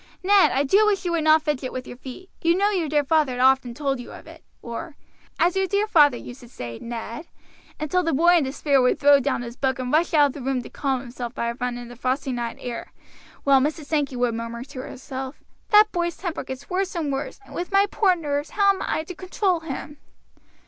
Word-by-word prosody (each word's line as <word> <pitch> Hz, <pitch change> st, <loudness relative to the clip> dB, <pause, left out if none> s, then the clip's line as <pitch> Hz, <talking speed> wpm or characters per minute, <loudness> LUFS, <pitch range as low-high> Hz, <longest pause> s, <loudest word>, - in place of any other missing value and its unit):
"Ned, 400 Hz, +1 st, +6 dB
I 275 Hz, -, +2 dB
do 400 Hz, +10 st, +4 dB
wish 395 Hz, -2 st, +1 dB
you 350 Hz, -, 0 dB
would 330 Hz, -2 st, 0 dB
not 310 Hz, 0 st, +5 dB
fidget 275 Hz, -4 st, -2 dB
with 255 Hz, 0 st, -5 dB
your -, -, -9 dB
feet. 265 Hz, +9 st, -11 dB
You 335 Hz, +1 st, +3 dB
know 405 Hz, +2 st, +2 dB
your 350 Hz, -6 st, -1 dB
dear 295 Hz, 0 st, +2 dB
father 285 Hz, -4 st, +1 dB
often 260 Hz, -2 st, +3 dB
told 275 Hz, -1 st, -1 dB
you 245 Hz, -, -9 dB
of -, -, -11 dB
it;" -, -, -14 dB, 0.2 s
or, 240 Hz, +7 st, -6 dB, 0.4 s
"As 350 Hz, +2 st, +2 dB
your 385 Hz, 0 st, +1 dB
dear 405 Hz, +2 st, +1 dB
father 295 Hz, -, +5 dB
used 245 Hz, +2 st, -10 dB
to 240 Hz, -, -14 dB
say, 120 Hz, -, -7 dB
Ned;" 235 Hz, +5 st, -6 dB, 0.5 s
until 310 Hz, +4 st, +1 dB
the 330 Hz, -2 st, 0 dB
boy 345 Hz, +5 st, +5 dB
in 325 Hz, -, +2 dB
despair 275 Hz, 0 st, +1 dB
would 250 Hz, -, +2 dB
throw 285 Hz, 0 st, +6 dB
down 245 Hz, -, -1 dB
his 235 Hz, 0 st, -8 dB
book 265 Hz, -1 st, 0 dB
and 255 Hz, 0 st, -4 dB
rush 325 Hz, +1 st, +2 dB
out 295 Hz, -1 st, +7 dB
of 280 Hz, -, -1 dB
the 285 Hz, -, -8 dB
room 260 Hz, -1 st, -1 dB
to -, -, -11 dB
calm 270 Hz, -3 st, -1 dB
himself 240 Hz, -1 st, -7 dB
by 235 Hz, 0 st, -1 dB
a -, -, -6 dB
run 245 Hz, 0 st, -3 dB
in 240 Hz, 0 st, -8 dB
the 245 Hz, -, -11 dB
frosty 260 Hz, +3 st, -1 dB
night 240 Hz, -2 st, -3 dB
air; 240 Hz, -2 st, -6 dB, 0.5 s
while 275 Hz, -1 st, +5 dB
Mrs. 300 Hz, +2 st, -2 dB
Sankey 285 Hz, -3 st, -1 dB
would 245 Hz, -1 st, +1 dB
murmur 230 Hz, +1 st, -5 dB
to 270 Hz, 0 st, -10 dB
herself, 265 Hz, +1 st, -7 dB, 0.3 s
"That 425 Hz, 0 st, +6 dB
boy's 345 Hz, -1 st, -2 dB
temper 345 Hz, -2 st, -4 dB
gets 265 Hz, +1 st, -8 dB
worse 380 Hz, +1 st, -2 dB
and 305 Hz, -5 st, -1 dB
worse, 275 Hz, +7 st, -4 dB
and -, -, -14 dB
with 355 Hz, +2 st, -4 dB
my 395 Hz, +1 st, +5 dB
poor 395 Hz, -2 st, +2 dB
nerves 295 Hz, -2 st, -3 dB
how 400 Hz, +3 st, +4 dB
am 385 Hz, -, -7 dB
I 315 Hz, -, -1 dB
to 365 Hz, -, -8 dB
control 370 Hz, 0 st, -1 dB
him?" 295 Hz, -1 st, -7 dB
285 Hz, 240 wpm, -24 LUFS, 255-345 Hz, 0.5 s, out